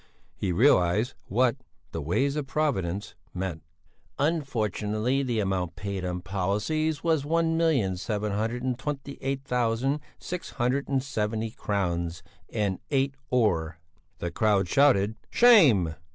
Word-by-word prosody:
He 95 - -2
realized 105 0 +3
what 125 +4 +2 0.3
"the 80 - -4
ways 135 - 0
of 150 -3 -3
Providence" 105 - -1 0.2
meant. 90 -3 -3 0.6
"Unfortunately 125 - 0
the 120 -4 -1
amount 95 -4 -1
paid 100 -2 -4
on 90 0 -3
policies 105 - -1
was 160 -4 +2
one 165 +2 +1
million 135 - +2
seven 105 +2 -2
hundred 115 +4 -2
and 130 -1 -1
twenty 140 -1 -5
eight 135 0 -2
thousand 125 +2 0 0.2
six 180 0 -6
hundred 130 +2 0
and 135 -2 +1
seventy 110 -4 -2
crowns 85 -6 -2 0.3
and 100 -4 -1
eight 135 -1 +1 0.2
öre." 90 -10 +1 1.5
"Shame!" 145 - +6
115 Hz, 120 wpm, -27 LUFS, 95-140 Hz, 1.5 s, Shame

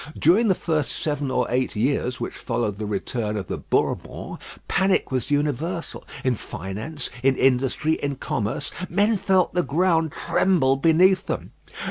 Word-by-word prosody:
During 195 +9 +4
the 190 - +4
first 155 -6 -1
seven 145 -3 -2
or 125 -1 +1
eight 125 0 0
years 125 +2 0
which - - -4
followed 115 -5 -2
the 105 0 -4
return 105 +1 -2
of 100 - -3
the - - -4
Bourbons, - - -2 0.3
panic 190 -5 +2
was 130 -3 -1
universal 150 +4 -2 0.2
in 130 - +2
finance, 110 - -5
in 135 +1 +3
industry, 135 +5 +2
in 140 -1 -1
commerce, 110 -4 -3 0.2
men 205 +5 +3
felt 190 -2 +2
the 180 - +2
ground 165 -1 +1
tremble 150 -8 +2
beneath 180 +6 +4
them. - - -3
145 Hz, 150 wpm, -24 LUFS, 125-170 Hz, 0.3 s, During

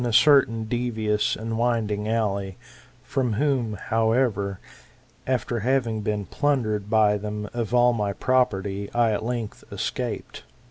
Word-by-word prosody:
a 120 - 0
certain 115 -3 +5
devious 110 -2 0
and 115 +1 -4
winding 110 -3 0
valley: 100 -4 -1 0.5
from 130 -5 -1
whom, 125 -2 0
however, 110 -2 0 0.7
after 120 -2 0
having 120 -2 0
been 105 -1 -2
plundered 110 -9 0
by 105 -2 +3
them 105 0 -4
of 120 -2 -3
all 120 0 +4
my 105 -3 -1
property, 100 -4 0
I 120 -2 +3
at 105 - -1
length 115 -2 -4
escaped. - - -4
110 Hz, 130 wpm, -25 LUFS, 105-120 Hz, 0.7 s, certain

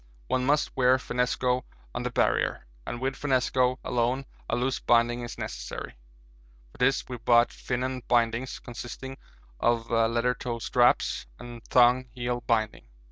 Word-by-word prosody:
One 125 - 0
must 145 +1 +1
wear 130 0 +4
finnesko 125 0 0 0.3
on - - -3
the - - -2
Barrier, - - +1 0.2
and 120 - -4
with 135 +1 -1
finnesko 130 -2 +1
alone 125 +3 0 0.2
a - - +1
loose 125 +2 0
binding 120 0 +3
is 120 -1 -7
necessary. - - -6 0.8
For - - -19
this 135 +2 +2
we 125 - -5
brought 120 +1 +4
'Finon' 130 +1 -3
bindings, 120 +1 +1
consisting 120 +2 -8 0.4
of 120 -1 +1
leather 115 +2 +2
toe 120 -1 -4
straps 120 - +2
and 120 -1 -10
thong 125 0 +4
heel 120 0 -2
binding. 110 - 0
125 Hz, 140 wpm, -27 LUFS, 120-130 Hz, 0.8 s, wear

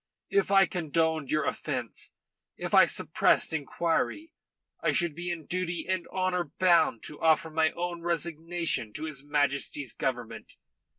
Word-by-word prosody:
If 405 +1 +2
I 195 -1 +6
condoned 160 -4 0
your 155 0 +1
offence, 125 -6 -4 0.5
if - - -5
I - - +8
suppressed - - +2
inquiry, 165 - -1 0.5
I - - +1
should 175 -4 +2
be 175 +3 -5
in 170 -3 -4
duty 180 -1 -2
and 185 -2 -1
honour 185 -1 -1
bound 170 -10 +3
to 150 - -7
offer 160 0 +3
my 160 0 +3
own 175 0 -4
resignation 170 -7 -2
to 150 - -5
his 150 -4 -5
Majesty's 145 -2 -1
Government. - - -4
165 Hz, 140 wpm, -28 LUFS, 150-175 Hz, 0.5 s, I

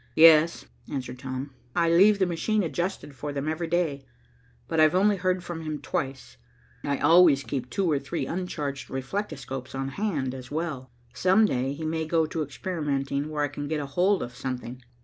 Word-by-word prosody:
"Yes," 165 0 +6 0.3
answered 130 -3 -4
Tom. 130 +1 -5 0.2
"I 170 - +3
leave 195 +5 +6
the 190 - +3
machine 190 +5 0
adjusted 175 -2 -3
for 145 +3 -5
them 140 +1 -3
every 160 +2 -2
day, 160 -5 0 0.6
but - - -1
I've 155 +2 +5
only 205 +2 +4
heard 185 0 0
from 175 -2 -5
him 155 -1 -3
twice. 135 -3 -4 0.5
I 140 -1 0
always 160 -3 +6
keep 125 0 -4
two 185 0 0
or 145 - +2
three 140 +5 -3
uncharged 150 -6 -4
reflectoscopes 135 -3 -4
on 135 0 -2
hand, 145 -6 -2
as 130 -1 -8
well. 150 -4 -3 0.2
Some 190 +9 +4
day 130 -7 0
he 160 +2 -6
may 160 0 -1
go 160 0 +2
to 160 +1 -3
experimenting 145 -2 -2
where 150 -1 -1
I - - +2
can 145 +1 -6
get 155 0 -1
hold 175 +8 +1
of 120 0 -8
something." 125 0 -5
155 Hz, 180 wpm, -27 LUFS, 135-175 Hz, 0.6 s, Yes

